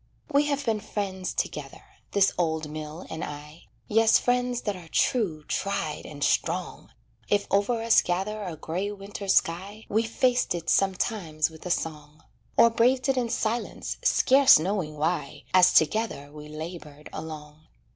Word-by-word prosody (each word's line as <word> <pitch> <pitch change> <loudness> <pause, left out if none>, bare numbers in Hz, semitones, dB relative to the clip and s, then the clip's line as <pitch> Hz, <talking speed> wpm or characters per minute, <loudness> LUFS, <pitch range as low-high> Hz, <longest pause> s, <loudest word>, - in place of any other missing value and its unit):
We 290 +1 +4
have 285 -1 -1
been 225 -2 +1
friends 195 -3 -4
together, - - -4 0.3
this 195 -1 +3
old 160 -3 -1
mill 155 +2 -7
and 160 0 -4
I, 150 +2 -9 0.2
Yes, 225 +1 +5
friends 245 0 0
that 205 -2 -2
are 175 -3 -11
true, 175 - 0
tried, 165 -6 -2
and 145 -2 -6
strong; 175 +2 -1 0.4
If 205 0 +2
over 225 +3 +1
us 230 0 +5
gather 195 +4 -2
a 180 -5 -5
gray 180 +6 -3
winter 200 0 -8
sky 195 +3 0
We 220 +2 +2
faced 245 -1 +1
it 170 -1 -2
sometimes 185 -5 0
with 160 +3 -10
a - - -4
song, 150 -3 -4 0.3
Or 235 - +7
braved 255 +4 +2
it 270 - +3
in 240 -2 0
silence, 230 +1 -2
scarce 270 0 +6
knowing 165 -2 -2
why, 150 -2 -2
As 185 -1 +7
together 160 -4 +1
we 150 0 -10
labored 155 -1 -8
along. 155 -1 -9
185 Hz, 155 wpm, -26 LUFS, 155-220 Hz, 0.4 s, Or